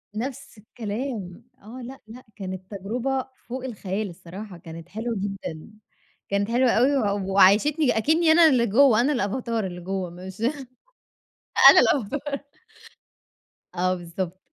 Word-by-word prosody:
نفس 240 Hz, 0 st, -6 dB
الكلام. 215 Hz, -3 st, -6 dB, 0.2 s
آه. 230 Hz, +5 st, -10 dB
لأ، 265 Hz, +2 st, -9 dB
لأ 245 Hz, +3 st, -12 dB
كانت 185 Hz, -1 st, -7 dB
تجربة 250 Hz, +7 st, -2 dB, 0.2 s
فوق 255 Hz, +1 st, -5 dB
الخيال 210 Hz, -4 st, -4 dB
الصراحة، 185 Hz, +3 st, -10 dB
كانت 165 Hz, 0 st, -11 dB
حلوة 225 Hz, +4 st, -4 dB
جدًا. 195 Hz, -4 st, -5 dB, 0.6 s
كانت 200 Hz, +2 st, 0 dB
حلوة 250 Hz, +1 st, +3 dB
أوي 265 Hz, +5 st, +3 dB, 0.2 s
و 190 Hz, 0 st, -4 dB
وعيّشتني 225 Hz, -, +4 dB
أكنِّي 315 Hz, +7 st, +3 dB
أنا 325 Hz, 0 st, +7 dB
اللي 245 Hz, -4 st, +3 dB
جوّه، 235 Hz, +1 st, +5 dB
أنا 290 Hz, +4 st, +2 dB
الأفاتار 230 Hz, -2 st, -2 dB
اللي 175 Hz, -1 st, -6 dB
جوّه 190 Hz, 0 st, -3 dB
مش 185 Hz, +3 st, -10 dB, 1.3 s
أنا -, -, +7 dB
الأفاتار. 280 Hz, +3 st, 0 dB, 1.3 s
آه 185 Hz, +1 st, 0 dB
بالضبط. 175 Hz, +1 st, -5 dB
215 Hz, 130 wpm, -24 LUFS, 190-255 Hz, 1.3 s, أنا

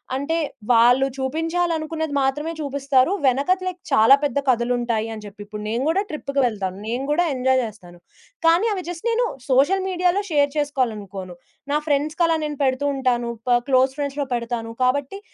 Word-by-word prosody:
అంటే 285 Hz, +5 st, -1 dB, 0.4 s
వాళ్ళు 245 Hz, +3 st, +5 dB
చూపించాలనుకున్నది 320 Hz, +2 st, -2 dB
మాత్రమే 285 Hz, +4 st, 0 dB
చూపిస్తారు. 280 Hz, 0 st, +1 dB
వెనకతలే 365 Hz, +9 st, +1 dB, 0.2 s
చాలా 265 Hz, 0 st, +7 dB
పెద్ద 285 Hz, -1 st, 0 dB
కథలుంటాయని 235 Hz, -3 st, 0 dB
జెప్పి. 205 Hz, 0 st, -11 dB
ఇప్పుడు 210 Hz, 0 st, -8 dB
నేను 230 Hz, +3 st, -1 dB
గూడా 355 Hz, +5 st, +2 dB
ట్రిప్‌కి 280 Hz, -3 st, -2 dB
వెళ్తాను, 195 Hz, -5 st, -2 dB
నేను 245 Hz, +3 st, -2 dB
గూడా 350 Hz, +4 st, +3 dB
ఎంజాయ్ 260 Hz, +1 st, +2 dB
జేస్తాను. 200 Hz, -6 st, -8 dB, 0.5 s
కానీ 335 Hz, +6 st, +5 dB
అవి 375 Hz, -, -3 dB
జస్ట్ 350 Hz, +3 st, -7 dB
నేను 470 Hz, +1 st, +2 dB, 0.2 s
సోషల్ 285 Hz, +10 st, +3 dB
మీడియాలో 360 Hz, +1 st, +1 dB
షేర్ 290 Hz, -3 st, +2 dB
చేసుకోవాలనుకోను. 210 Hz, -10 st, -2 dB, 0.4 s
నా 295 Hz, -, +3 dB
ఫ్రెండ్స్‌కి 300 Hz, +4 st, +1 dB
అలా 330 Hz, 0 st, +2 dB
నేను 300 Hz, -1 st, -4 dB
పెడుతూ 260 Hz, +1 st, +1 dB
ఉంటాను. 245 Hz, -3 st, 0 dB, 0.4 s
క్లోజ్ 260 Hz, 0 st, +3 dB
ఫ్రెండ్స్‌లో 285 Hz, 0 st, -2 dB
పెడతాను. 235 Hz, -1 st, -3 dB
కాబట్టి 280 Hz, +8 st, 0 dB
270 Hz, 145 wpm, -22 LUFS, 240-310 Hz, 0.5 s, చాలా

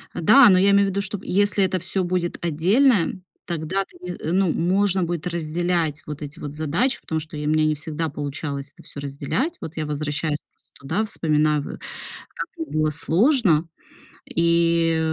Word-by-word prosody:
Да, 240 Hz, -, +7 dB
но 185 Hz, -2 st, +5 dB
я 200 Hz, +2 st, +4 dB
имею 200 Hz, 0 st, +4 dB
в -, -, 0 dB
виду, 200 Hz, +1 st, -1 dB
что 205 Hz, 0 st, -5 dB
если 205 Hz, +1 st, +2 dB
это 185 Hz, -1 st, 0 dB
всё 190 Hz, +2 st, -2 dB
будет 175 Hz, -1 st, -1 dB
отдельное, 185 Hz, -, +3 dB, 0.3 s
тогда 170 Hz, +3 st, -2 dB
ты -, -, -20 dB
не 180 Hz, 0 st, -5 dB, 0.2 s
ну, 185 Hz, -1 st, +2 dB
можно 190 Hz, +2 st, +1 dB
будет 170 Hz, -1 st, -3 dB
разделять 170 Hz, -2 st, -1 dB
вот 150 Hz, 0 st, -7 dB
эти 150 Hz, +3 st, -7 dB
вот 145 Hz, -1 st, -6 dB
задачи, 160 Hz, -, 0 dB
потому 160 Hz, -, -2 dB
что 155 Hz, 0 st, -8 dB
я 150 Hz, 0 st, -3 dB
у -, -, +2 dB
меня 155 Hz, 0 st, +3 dB
не 155 Hz, 0 st, +2 dB
всегда 160 Hz, +1 st, -3 dB
получалось 140 Hz, 0 st, -5 dB
это -, -, -17 dB
всё -, -, -8 dB
разделять. 145 Hz, -, -2 dB
Вот 160 Hz, -, -7 dB
я 155 Hz, -, -2 dB
возвращаюсь 150 Hz, +1 st, -2 dB
просто -, -, -43 dB
туда, 140 Hz, +10 st, -1 dB
вспоминаю, 155 Hz, -7 st, +1 dB
в -, -, -8 dB, 0.5 s
как -, -, -8 dB
мне 325 Hz, -, -3 dB
было 155 Hz, -, +1 dB
сложно, 170 Hz, -, +3 dB, 0.6 s
и 170 Hz, -1 st, +2 dB
165 Hz, 180 wpm, -23 LUFS, 150-190 Hz, 0.6 s, Да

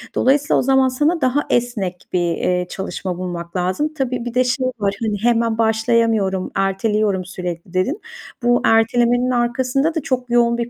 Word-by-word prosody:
Dolayısıyla 280 Hz, +2 st, +3 dB
o -, -, +2 dB
zaman 265 Hz, 0 st, +3 dB
sana 295 Hz, +6 st, 0 dB
daha 260 Hz, +3 st, +2 dB
esnek 235 Hz, -7 st, 0 dB, 0.2 s
bir, 180 Hz, -, +2 dB, 0.2 s
eee, 180 Hz, 0 st, 0 dB
çalışma 190 Hz, -1 st, -4 dB
bulmak 175 Hz, -1 st, -6 dB
lazım. 185 Hz, -, -1 dB
Tabii, 255 Hz, -4 st, -2 dB
bir 240 Hz, -, -4 dB
de 255 Hz, +1 st, +3 dB
şey 255 Hz, +1 st, -1 dB
var, 200 Hz, -1 st, 0 dB
hani, 215 Hz, -2 st, -1 dB
hemen 230 Hz, -1 st, +2 dB
başlayamıyorum, 220 Hz, -4 st, +1 dB
erteliyorum 195 Hz, 0 st, 0 dB
sürekli 180 Hz, -1 st, -6 dB
dedin. 225 Hz, -, 0 dB, 0.4 s
Bu 240 Hz, 0 st, +3 dB
ertelemenin 240 Hz, +2 st, +3 dB
arkasında 255 Hz, +5 st, 0 dB
da 320 Hz, -, 0 dB
çok 255 Hz, -2 st, -2 dB
yoğun 235 Hz, 0 st, +3 dB
bir 235 Hz, 0 st, -3 dB
235 Hz, 165 wpm, -19 LUFS, 195-255 Hz, 0.4 s, Dolayısıyla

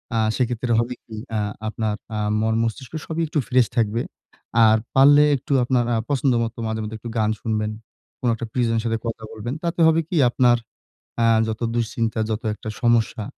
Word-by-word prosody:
আ -, -, +2 dB, 0.2 s
সেক্ষেত্রে 120 Hz, -1 st, -1 dB
হবে 120 Hz, +2 st, -1 dB
কি, 110 Hz, -, -9 dB, 0.2 s
আ -, -, +1 dB, 0.3 s
আপনার 110 Hz, -1 st, -2 dB, 0.2 s
আ -, -, -1 dB, 0.2 s
মন-মস্তিষ্ক 115 Hz, +4 st, -1 dB
সবই 165 Hz, +1 st, -3 dB
একটু 150 Hz, -, -1 dB
ফ্রেশ 125 Hz, -2 st, +4 dB
থাকবে। 115 Hz, +1 st, +1 dB, 0.6 s
আর 110 Hz, 0 st, +5 dB, 0.2 s
পারলে 145 Hz, +2 st, +7 dB
একটু 135 Hz, +2 st, -7 dB
আপনার 120 Hz, -1 st, +1 dB
আ -, -, +2 dB
পছন্দ 135 Hz, -2 st, +2 dB
মতো 115 Hz, +1 st, -5 dB
মাঝে 110 Hz, 0 st, -2 dB
মধ্যে 110 Hz, +1 st, -5 dB
একটু 120 Hz, -, -7 dB
গান 110 Hz, 0 st, +2 dB
শুনবেন। 110 Hz, -1 st, -1 dB, 0.5 s
কোনো 120 Hz, -, +3 dB
একটা 115 Hz, 0 st, -6 dB
প্রিয়জন 115 Hz, -2 st, +1 dB
এর 110 Hz, -, -1 dB
সাথে 115 Hz, 0 st, 0 dB
কথা 115 Hz, -1 st, -4 dB
বলবেন। 115 Hz, +4 st, -5 dB
তাতে 170 Hz, 0 st, -1 dB
হবে 160 Hz, 0 st, +4 dB
কি? 180 Hz, -, -3 dB
আপনার 120 Hz, -1 st, +4 dB, 0.7 s
আ -, -, +5 dB, 0.2 s
যত 110 Hz, +1 st, -4 dB
দুশ্চিন্তা, 115 Hz, -1 st, -1 dB
যত 110 Hz, +1 st, -2 dB
একটা 110 Hz, -, -7 dB
সমস্যা, 115 Hz, -2 st, +2 dB
115 Hz, 185 wpm, -22 LUFS, 110-125 Hz, 0.7 s, পারলে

